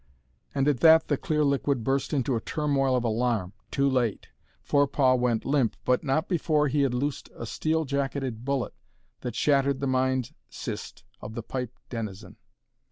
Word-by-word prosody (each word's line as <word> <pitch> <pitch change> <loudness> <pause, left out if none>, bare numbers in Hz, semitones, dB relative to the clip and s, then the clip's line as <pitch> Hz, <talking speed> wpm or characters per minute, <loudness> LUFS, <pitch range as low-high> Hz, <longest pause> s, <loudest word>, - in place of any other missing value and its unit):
And 135 0 +2
at 145 -5 +2
that 160 +2 +6
the 145 - +3
clear 150 +2 0
liquid 140 -3 +1
burst 135 +3 0
into 135 -3 +1
a 115 - -1
turmoil 140 -3 +1
of 125 - +1
alarm. 115 -4 0 0.2
Too 140 0 +1
late. 125 -5 0 0.3
Forepaugh 140 -2 +3
went 125 -3 +1
limp, 135 -5 +1
but 125 0 +2
not 145 +6 0
before 155 -4 +1
he 145 +2 +1
had 135 -3 +1
loosed 140 +2 -2
a 115 - -6
steel 160 +7 0
jacketed 135 -4 -2
bullet 135 -1 -1 0.5
that 125 - -5
shattered 140 -2 +2
the 140 - -1
mind 130 0 0 0.2
cyst - - -6 0.2
of 110 +1 -8
the 115 - -4
pipe 125 0 -5
denizen. 105 -5 -6
135 Hz, 165 wpm, -27 LUFS, 120-145 Hz, 0.5 s, that